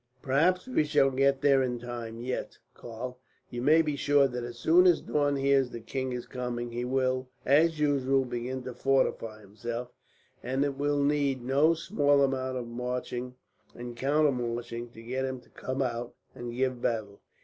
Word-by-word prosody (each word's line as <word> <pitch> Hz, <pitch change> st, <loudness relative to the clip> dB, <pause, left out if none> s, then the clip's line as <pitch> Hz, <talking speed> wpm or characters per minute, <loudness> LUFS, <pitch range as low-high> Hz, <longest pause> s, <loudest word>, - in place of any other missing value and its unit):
"Perhaps 170 Hz, -, +2 dB
we 255 Hz, -11 st, +2 dB
shall 135 Hz, -2 st, +3 dB
get 135 Hz, +1 st, +2 dB
there 140 Hz, -2 st, +5 dB
in 125 Hz, -2 st, -1 dB
time 120 Hz, -1 st, -6 dB
yet, 125 Hz, +1 st, -4 dB, 0.2 s
Karl. 125 Hz, +2 st, -7 dB, 0.3 s
You 120 Hz, -, -4 dB
may 155 Hz, +5 st, +5 dB
be 150 Hz, -2 st, -1 dB
sure 140 Hz, -1 st, +4 dB
that 125 Hz, -2 st, -5 dB
as 120 Hz, 0 st, -7 dB
soon 175 Hz, +8 st, +5 dB
as 175 Hz, -3 st, +5 dB
Daun 145 Hz, -1 st, 0 dB
hears 135 Hz, -1 st, +3 dB
that -, -, -17 dB
the 115 Hz, -, -11 dB
king 130 Hz, +2 st, -3 dB
is 125 Hz, -1 st, -4 dB
coming 120 Hz, -1 st, -4 dB
he 120 Hz, +1 st, -3 dB
will, 130 Hz, 0 st, 0 dB, 0.2 s
as 155 Hz, +4 st, +4 dB
usual, 135 Hz, -2 st, +2 dB
begin 125 Hz, +1 st, -4 dB
to 125 Hz, 0 st, -6 dB
fortify 120 Hz, -4 st, 0 dB
himself; 115 Hz, +4 st, -6 dB, 0.5 s
and 130 Hz, +3 st, 0 dB
it 140 Hz, -1 st, -2 dB
will 145 Hz, 0 st, +1 dB
need 140 Hz, -3 st, +1 dB
no 140 Hz, +6 st, +3 dB
small 145 Hz, -5 st, +2 dB
amount 130 Hz, -1 st, -1 dB
of 125 Hz, -, -4 dB
marching 125 Hz, +1 st, -4 dB, 0.4 s
and 120 Hz, 0 st, -7 dB
counter 145 Hz, +4 st, +2 dB
marching 120 Hz, -1 st, -4 dB
to 115 Hz, -1 st, -13 dB
get 130 Hz, +3 st, -2 dB
him 130 Hz, -1 st, -3 dB
to -, -, -23 dB
come 130 Hz, +1 st, -3 dB
out 120 Hz, -1 st, -4 dB, 0.2 s
and 120 Hz, 0 st, -6 dB
give 130 Hz, -1 st, -1 dB
battle. 110 Hz, -4 st, -2 dB
130 Hz, 180 wpm, -29 LUFS, 120-140 Hz, 0.5 s, there